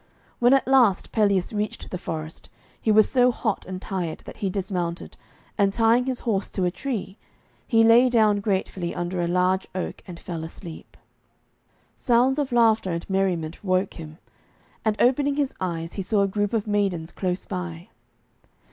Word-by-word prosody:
When 245 +2 +5
at 270 - +1
last 250 -8 +3
Pelleas 200 -3 +1
reached 210 0 -4
the 180 - -3
forest, 155 -1 -6 0.3
he 220 - +2
was 215 0 +6
so 250 -1 +4
hot 220 -3 -3
and 185 0 -5
tired 180 -4 -4
that - - -10
he 195 - -1
dismounted, 180 -3 -3 0.4
and 200 -1 +4
tying 230 +3 +3
his 255 -2 -2
horse 205 -5 -1
to 185 - -1
a 180 - +1
tree, 205 -2 -5 0.5
he 225 -1 +4
lay 235 +3 +6
down 215 -4 +3
gratefully 190 -3 -2
under 175 +1 -2
a 170 - 0
large 180 +2 +1
oak 185 - -4
and 175 -2 -9
fell 165 -3 -6
asleep. 165 0 -10 1.0
Sounds 255 +3 +2
of 280 -3 -1
laughter 225 -4 +3
and 170 0 -4
merriment 180 -4 -1
woke 185 0 0
him, 155 -2 -10 0.7
and 215 -1 0
opening 275 +3 +3
his 280 -2 -1
eyes 165 -2 -3
he 200 - -3
saw 200 +2 +1
a - - +2
group 205 +1 -1
of 220 -3 0
maidens 195 -6 -1
close 180 -1 -3
by. 180 0 -6
195 Hz, 170 wpm, -24 LUFS, 180-225 Hz, 1.0 s, was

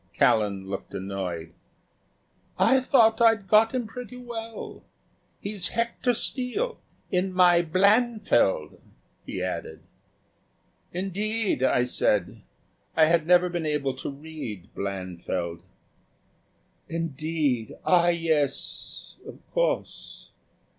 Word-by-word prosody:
Callan 100 -3 +2
looked 95 0 -6
annoyed. 90 -4 -4 1.0
"I 265 - +5
thought 235 -4 +4
I'd 225 -4 +4
got 220 +4 +5
him 250 -2 -1
pretty 250 +2 -8
well. 230 -2 -7 0.6
He's 200 -3 -1
Hector 235 +1 0
Steele. 280 - -1 0.3
In 185 +1 +1
my 180 -2 +5
'Blanfield,'" 200 - +2 0.5
he - - -4
added. - - -4 1.1
"Indeed!" 200 - -1
I 125 -1 +3
said. 125 - 0 0.6
I 160 - +7
had 165 0 +2
never 180 0 +5
been 175 -3 -3
able 145 -3 0
to - - -5
read 140 - -8
"Blanfield." 90 -3 -4 1.3
"Indeed, 155 -6 -1
ah, 175 -1 +4
yes 165 -4 -1
of - - -9
course." - - -2
170 Hz, 100 wpm, -26 LUFS, -, 1.3 s, I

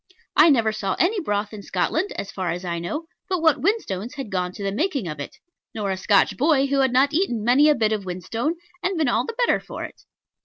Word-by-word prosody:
I 330 - +7
never 230 -6 +3
saw 200 -3 -2
any 395 +5 +2
broth 210 - -2
in 210 - -7
Scotland, 315 - -1
as 200 - -5
far 185 -2 -3
as 175 +2 -3
I 170 -1 -2
know, 300 - -4 0.2
but 370 -2 0
what 320 -2 +3
whinstones 250 - -1
had 270 -7 -6
gone 180 -1 -1
to 200 - -7
the 195 - -1
making 275 - -1
of 150 -2 -6
it; 145 - -7 0.4
nor 205 -3 -2
a - - 0
Scotch 200 +1 +3
boy 285 0 +3
who 275 0 0
had 265 -2 +3
not 270 +4 +3
eaten 300 - 0
many 265 +6 +5
a 300 - +5
bit 220 -3 +1
of 210 -2 -1
whinstone, 210 - -3 0.3
and 365 0 -1
been 315 -3 +1
all - - +1
the 460 - -5
better - - +3
for - - -8
it. - - -9
230 Hz, 240 wpm, -23 LUFS, 195-305 Hz, 0.4 s, I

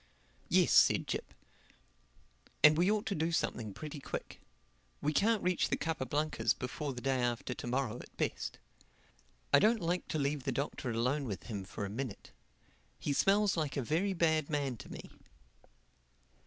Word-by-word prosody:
"Yes," - - +4
said - - +6
Jip, - - -4 1.3
"and 150 +1 +9
we 175 +4 +3
ought 215 +1 +1
to 220 - -1
do 160 -1 0
something 115 -9 -1
pretty 150 +8 -7
quick. - - -6 0.6
We 150 +1 0
can't 215 +5 +3
reach 180 -1 +1
the - - +1
Capa 160 -5 -2
Blancas 155 +1 +1
before 140 +3 -4
the 125 - -7
day 135 -1 +1
after 120 +1 -1
to 120 - -7
morrow 125 -2 -1
at - - -13
best. - - -2 1.0
I - - +9
don't 220 +3 +4
like 175 0 -1
to - - -2
leave 140 -1 -1
the 135 - -1
Doctor 135 0 -3
alone 125 +5 0
with 100 -7 -5
him 105 -5 -5
for 100 +2 -5
a - - -5
minute. 120 -2 -5 0.7
He 145 - -1
smells 200 +6 +3
like 155 -4 -1
a 135 - 0
very 175 - +1
bad 160 -3 +2
man 140 -4 -1
to 90 - -11
me." - - -9
145 Hz, 170 wpm, -33 LUFS, 125-165 Hz, 1.3 s, and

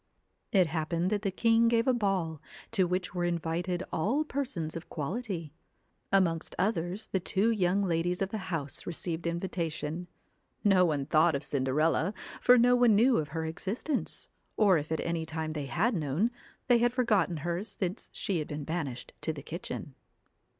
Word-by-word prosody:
It 190 -5 +5
happened 165 +3 -1
that 205 -1 +1
the 205 - 0
king 230 +4 +3
gave 230 +1 +2
a 260 - +5
ball, 190 -9 0 0.3
to 195 -5 +3
which 180 0 -2
were 175 -1 -1
invited 175 +1 -1
all 240 - +1
persons 255 - -3
of 165 - -7
quality. 170 - -4 0.6
Amongst 175 -4 +2
others 190 0 -1
the 190 - +1
two 195 +5 +2
young 195 -2 +2
ladies 175 0 0
of 195 - 0
the 220 - -3
house 145 -6 -3
received 170 0 -3
invitation. 170 -1 -3 0.6
No 190 -3 +5
one 145 -5 0
thought 155 +2 +4
of 140 - -3
Cinderella, 150 +7 +1 0.3
for 250 0 +7
no 245 +1 +5
one 245 -3 +5
knew 240 +4 +5
of 155 - 0
her 160 +2 -3
existence; 200 - -3 0.3
or 195 -6 +5
if 150 +2 -7
at 160 - 0
any 170 -1 -1
time 160 0 -3
they 145 -3 -4
had 200 - +1
known, 165 - 0 0.4
they 245 -2 +5
had 240 +1 +2
forgotten 210 -9 +2
her 175 +2 -1
since 190 -2 -4
she 195 -6 -1
had 150 - -3
been 150 0 -5
banished 145 -6 -4
to 160 - -1
the 145 -3 -8
kitchen. 160 -3 -6
175 Hz, 170 wpm, -30 LUFS, 160-210 Hz, 0.6 s, for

